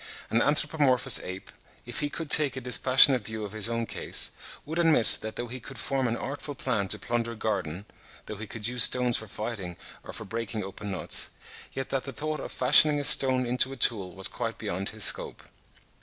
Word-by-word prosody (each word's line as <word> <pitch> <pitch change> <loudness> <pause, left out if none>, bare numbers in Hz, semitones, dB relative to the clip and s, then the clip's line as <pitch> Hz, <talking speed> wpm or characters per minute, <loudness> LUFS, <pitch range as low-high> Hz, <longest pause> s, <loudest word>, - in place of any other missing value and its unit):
An 115 - +2
anthropomorphous 145 -4 +2
ape, 95 +1 -9 0.3
if - - -5
he 145 - -2
could 160 0 -6
take 145 -4 +6
a - - -2
dispassionate 130 +1 +4
view 110 0 -6
of 100 - -9
his 110 +1 +3
own 115 0 -2
case, - - +1 0.3
would 160 +3 -5
admit 160 -9 +3
that 110 0 -7
though 120 - -4
he 125 +2 -8
could 135 +2 -12
form 135 -2 -2
an 115 0 -2
artful 145 +1 -6
plan 115 -7 -2
to 105 - 0
plunder 115 +1 -3
a - - -11
garden—though 100 0 -7
he 110 +1 -8
could 110 +1 -5
use 125 0 +1
stones 125 0 +4
for 110 - -8
fighting 100 -4 -7 0.3
or - - -10
for - - -8
breaking 115 -2 -5
open 100 +2 -8
nuts, 95 - -2 0.4
yet 135 -1 -5
that 135 -1 -3
the 140 - -7
thought 155 +3 -4
of - - -7
fashioning 145 +3 +5
a - - -3
stone 130 -2 +5
into 125 +2 0
a 135 - -8
tool 100 -6 +1
was 95 0 -1
quite - - -5
beyond 95 +3 -4
his 110 -1 -3
scope. - - +2
120 Hz, 205 wpm, -26 LUFS, 110-135 Hz, 0.4 s, take